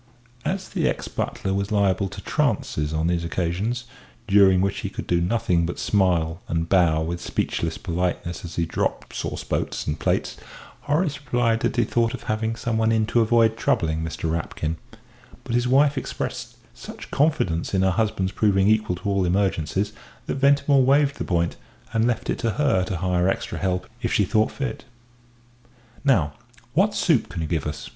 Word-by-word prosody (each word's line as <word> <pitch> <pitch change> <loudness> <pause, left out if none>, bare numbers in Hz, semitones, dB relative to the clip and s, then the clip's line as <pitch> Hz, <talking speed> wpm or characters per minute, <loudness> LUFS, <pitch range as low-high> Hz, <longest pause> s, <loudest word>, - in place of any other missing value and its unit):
As 190 +1 -2
the - - 0
ex - - -3
butler 95 - -3
was 100 +1 -1
liable 100 -2 +2
to - - -8
trances 75 0 0
on 80 0 0
these 85 0 +1
occasions 95 +8 -2 0.4
during 95 -2 +6
which 100 +1 0
he - - -3
could - - -6
do 85 -1 +1
nothing 90 -2 +1
but 85 +1 -3
smile 85 -4 +1
and 80 0 -1
bow 85 -4 +3
with 85 +2 -4
speechless 80 -1 -2
politeness 90 0 -2
as 85 -2 -7
he 85 - +1
dropped 80 - -2
sauce - - -4
boats - - -2
and 75 +1 -2
plates, - - 0 0.5
Horace 150 -1 0
replied 120 -3 +1
that - - -1
he 120 - +3
thought 115 +1 +1
of - - -11
having 110 +1 -1
someone 115 -1 0
in 110 -1 +2
to 120 - +5
avoid 115 0 +4
troubling 80 -7 0
Mr. 80 0 -3
Rapkin; 80 -1 -3 0.7
but 120 - -5
his 120 +1 +2
wife 140 +2 +4
expressed - - -5 0.2
such - - -10
confidence 135 - +1
in 95 - +3
her 95 - +3
husband's 95 -2 0
proving 95 -1 +2
equal 110 -4 +2
to 90 - -13
all 100 -1 +2
emergencies, 95 +1 0 0.3
that - - -3
Ventimore 140 0 +4
waived 140 +2 +3
the - - -1
point, 85 -2 0 0.4
and 115 +1 +2
left 120 - -1
it - - -1
to 115 -2 0
her 135 -11 +2
to 95 -1 -3
hire 90 0 +1
extra - - -3
help 90 -1 -1
if 115 - -1
she 105 - +3
thought 110 +3 +2
fit. 135 -5 -4 1.2
"Now, 95 - +3 0.4
what 195 +7 +3
soup 160 - +2
can 85 - -4
you - - -2
give 80 -2 -1
us?" 75 -1 -5
100 Hz, 180 wpm, -24 LUFS, 85-115 Hz, 1.2 s, during